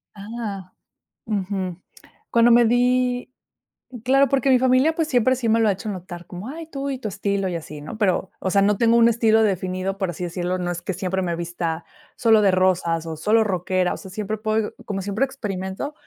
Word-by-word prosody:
Ah. 200 Hz, -3 st, -6 dB, 0.5 s
Ujú. 190 Hz, -4 st, -2 dB, 0.5 s
Cuando 235 Hz, 0 st, +5 dB
me 240 Hz, 0 st, +6 dB
di 250 Hz, +1 st, +2 dB, 0.7 s
claro, 275 Hz, +2 st, +4 dB
porque 270 Hz, -1 st, +1 dB
mi 255 Hz, -, +6 dB
familia, 260 Hz, +5 st, +3 dB
pues, 325 Hz, -2 st, 0 dB
siempre 255 Hz, -2 st, +3 dB
sí 235 Hz, -3 st, -1 dB
me 225 Hz, -, +3 dB
lo 225 Hz, -2 st, +3 dB
ha -, -, +4 dB
hecho 195 Hz, +3 st, -5 dB
notar, 180 Hz, -3 st, -6 dB
como: 180 Hz, +4 st, -8 dB
"Ay, 325 Hz, +3 st, -7 dB
tú 280 Hz, -2 st, -4 dB
y 270 Hz, -, -2 dB
tu 250 Hz, -, -5 dB
estilo 200 Hz, 0 st, -1 dB
y 180 Hz, -, -3 dB
así", 155 Hz, -2 st, -7 dB
¿no? 150 Hz, +8 st, -8 dB
Pero, 190 Hz, -2 st, +1 dB
o 190 Hz, -, -2 dB
sea, 200 Hz, +1 st, +3 dB
no 205 Hz, +1 st, +3 dB
tengo 230 Hz, +1 st, +4 dB
un 230 Hz, 0 st, +6 dB
estilo 225 Hz, -1 st, +3 dB
definido, 190 Hz, -1 st, -1 dB
por 190 Hz, -, -1 dB
así 175 Hz, +1 st, -5 dB
decirlo. 180 Hz, +1 st, -2 dB
No 175 Hz, -1 st, -2 dB
es 175 Hz, 0 st, -5 dB
que 190 Hz, +2 st, -3 dB
siempre 190 Hz, +1 st, -2 dB
me 175 Hz, -2 st, -1 dB
vista 170 Hz, -1 st, -4 dB, 0.3 s
solo 225 Hz, -2 st, +4 dB
de 200 Hz, -, +4 dB
rosas 180 Hz, -3 st, +1 dB
o 160 Hz, -1 st, -5 dB
solo 220 Hz, +7 st, +3 dB
rockera. 185 Hz, -2 st, 0 dB
O -, -, -6 dB
sea, 190 Hz, -, -11 dB
siempre 215 Hz, +2 st, -3 dB
puedo 215 Hz, 0 st, -1 dB
como 195 Hz, -1 st, -3 dB
siempre 205 Hz, +7 st, 0 dB
experimento, 205 Hz, 0 st, -5 dB
200 Hz, 210 wpm, -22 LUFS, 185-235 Hz, 0.7 s, me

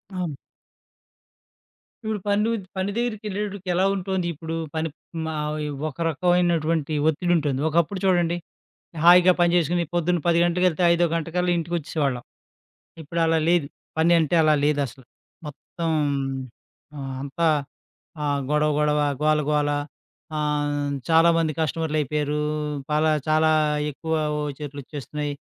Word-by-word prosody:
అవును. 170 Hz, -6 st, -3 dB, 1.7 s
ఇప్పుడు 215 Hz, -1 st, -2 dB
పని 205 Hz, +1 st, +2 dB
ఉద్ 200 Hz, -5 st, -4 dB
పని 190 Hz, +2 st, -1 dB
దగ్గరికెళ్ళేటప్పడికి 210 Hz, -4 st, -3 dB
ఎలా 185 Hz, +2 st, +3 dB
ఉంటోంది 190 Hz, -2 st, -2 dB
ఇప్పుడు 165 Hz, +2 st, -6 dB, 0.2 s
పనిప్ 160 Hz, -1 st, -2 dB, 0.3 s
మా 160 Hz, -, -3 dB, 0.3 s
ఈ -, -, -3 dB, 0.2 s
ఒక 130 Hz, -, -13 dB
రకమైనటువంటి 165 Hz, -2 st, +1 dB, 0.2 s
ఒత్తిడుంటుంది. 155 Hz, -4 st, 0 dB
ఒకప్పుడు 170 Hz, +4 st, +1 dB
చూడండి. 175 Hz, -2 st, +2 dB, 0.7 s
హాయిగా 180 Hz, +1 st, +8 dB
పనిచేసుకొని 175 Hz, 0 st, +2 dB
పొద్దున్న 175 Hz, 0 st, +1 dB
10 170 Hz, 0 st, +4 dB
గంటకెళ్తే 180 Hz, 0 st, +1 dB
ఐదో 170 Hz, +1 st, +3 dB
గంటకల్లా 175 Hz, +2 st, 0 dB
ఇంటికొచ్చేసేవాళ్ళం. 155 Hz, -6 st, -2 dB, 0.8 s
ఇప్పుడు 165 Hz, +3 st, -4 dB
అలా 165 Hz, 0 st, +2 dB
లేదు. 170 Hz, -5 st, +3 dB, 0.3 s
పనంటే 165 Hz, 0 st, +3 dB
అలా 155 Hz, -1 st, +4 dB
లేదసలు. 140 Hz, -3 st, -1 dB, 0.4 s
మొత్తం. 165 Hz, +3 st, -5 dB, 1.1 s
ఆహ్, 135 Hz, -1 st, -5 dB
అంతా 160 Hz, +4 st, -1 dB, 0.8 s
ఆహ్, 145 Hz, -1 st, 0 dB
గొడవ, 150 Hz, 0 st, +2 dB
గొడవ. 150 Hz, 0 st, +2 dB, 0.2 s
గోల, 155 Hz, 0 st, +3 dB
గోల. 150 Hz, -1 st, +2 dB, 0.7 s
ఆహ్, 145 Hz, -1 st, -1 dB, 0.2 s
చాలా 165 Hz, +1 st, +6 dB
మంది 165 Hz, -2 st, +1 dB
కస్టమర్లయిపోయారు. 150 Hz, -1 st, -1 dB, 0.5 s
పాలా 155 Hz, +1 st, +3 dB, 0.2 s
చాలా 155 Hz, 0 st, +3 dB, 0.4 s
ఎక్కువ 160 Hz, +3 st, -4 dB, 0.3 s
ఓచర్లొచ్చేస్తున్నాయి, 145 Hz, 0 st, -5 dB
160 Hz, 110 wpm, -24 LUFS, 150-175 Hz, 1.7 s, హాయిగా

